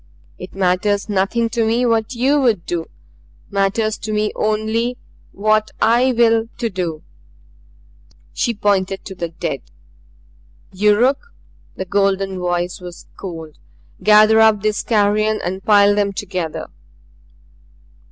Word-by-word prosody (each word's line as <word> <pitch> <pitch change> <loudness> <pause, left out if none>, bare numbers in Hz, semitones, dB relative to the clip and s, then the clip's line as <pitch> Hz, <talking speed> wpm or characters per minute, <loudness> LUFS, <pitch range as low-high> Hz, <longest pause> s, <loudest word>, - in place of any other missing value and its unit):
It 185 - -10
matters 195 +2 +1
nothing 205 +4 +1
to 235 -1 0
me 230 +3 +1
what 230 +1 0
YOU 275 +5 +2
would 220 -9 +1
do. 170 -2 -4 0.6
Matters 205 +2 0
to 215 - -5
me 210 0 0
only 220 +3 -1 0.3
what 215 +1 +1
I 240 +3 +3
will 230 -1 +3
to 235 -2 -2
do." 170 -4 -4 1.3
She 235 - -1
pointed 195 -2 0
to 195 - -7
the 170 -2 -5
dead. 160 - -4 1.1
"Yuruk" 230 - +2 0.4
the 190 - -5
golden 195 0 0
voice 175 0 -2
was 175 -1 -10
cold 165 -5 -9 0.4
"gather 215 +1 +6
up 220 -2 +4
these 215 0 0
carrion 215 -1 +1
and 190 +2 -4
pile 205 -1 +5
them 205 -1 0
together." 185 -5 -4
210 Hz, 125 wpm, -19 LUFS, 190-225 Hz, 1.3 s, gather